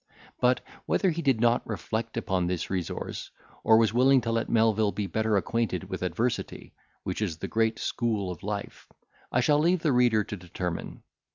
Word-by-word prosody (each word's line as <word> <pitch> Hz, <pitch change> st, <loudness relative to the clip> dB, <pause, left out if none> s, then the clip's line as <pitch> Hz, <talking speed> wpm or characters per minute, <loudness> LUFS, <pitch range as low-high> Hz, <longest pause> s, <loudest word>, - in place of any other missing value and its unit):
But, 125 Hz, 0 st, +3 dB, 0.3 s
whether 190 Hz, -, +2 dB
he 170 Hz, +1 st, -3 dB
did 135 Hz, -7 st, +2 dB
not 120 Hz, +1 st, +3 dB
reflect 110 Hz, +2 st, -3 dB
upon 90 Hz, -2 st, 0 dB
this 90 Hz, -1 st, -3 dB
resource, 90 Hz, -3 st, -4 dB, 0.3 s
or 110 Hz, -, +6 dB
was 110 Hz, -2 st, +3 dB
willing 130 Hz, +2 st, +5 dB
to 115 Hz, -, -2 dB
let 115 Hz, 0 st, -1 dB
Melvil 110 Hz, -2 st, +3 dB
be 105 Hz, -, -3 dB
better 110 Hz, +2 st, +1 dB
acquainted 115 Hz, +2 st, -1 dB
with -, -, -4 dB
adversity, -, -, -2 dB, 0.3 s
which -, -, -3 dB
is 90 Hz, -7 st, -1 dB
the -, -, -5 dB
great 110 Hz, 0 st, +1 dB
school 110 Hz, -6 st, -1 dB
of 85 Hz, -, -8 dB
life, 100 Hz, 0 st, -5 dB, 0.4 s
I -, -, +2 dB
shall 150 Hz, -1 st, +3 dB
leave 170 Hz, +2 st, +2 dB
the 155 Hz, -, +3 dB
reader 120 Hz, -3 st, +4 dB
to 105 Hz, -, -6 dB
determine. 90 Hz, -2 st, -5 dB
110 Hz, 180 wpm, -27 LUFS, 100-120 Hz, 0.4 s, or